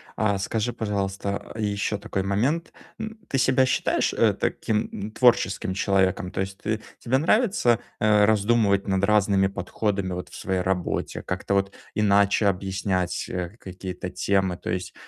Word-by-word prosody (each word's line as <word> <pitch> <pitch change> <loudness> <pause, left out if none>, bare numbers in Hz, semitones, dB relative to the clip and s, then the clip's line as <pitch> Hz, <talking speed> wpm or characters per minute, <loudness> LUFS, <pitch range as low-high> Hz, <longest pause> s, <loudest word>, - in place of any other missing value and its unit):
А 100 -2 +1
скажи, 110 +4 -1
пожалуйста, 100 -2 -3
ещё 105 0 -1
такой 95 -1 -3
момент, 130 - 0 0.3
м. 220 0 -5
Ты 135 - -1
себя 130 0 +4
считаешь, 130 - +1
э, - - +3
таким, 105 -1 -1
м, 105 +2 -5
творческим 105 -6 +2
человеком? 95 -2 +1
То - - -5
есть 95 0 -4
ты 110 0 -2 0.2
тебе 130 +2 +1
нравится, 180 - +3 0.2
э, 105 -1 +4
раздумывать 105 -1 +2
над 95 0 +1
разными 100 -2 +3
подходами 100 0 -2
вот 90 0 -5
в - - -12
своей 95 -1 -1
работе, 90 -1 -2
как-то 95 +1 -3
вот 100 0 0 0.2
иначе 100 0 +3
объяснять, 95 -1 -1
э, 90 -1 -3
какие-то 90 -1 -6
темы, 95 -2 0
то - - -7
есть, 90 0 -3
100 Hz, 150 wpm, -25 LUFS, 95-110 Hz, 0.3 s, себя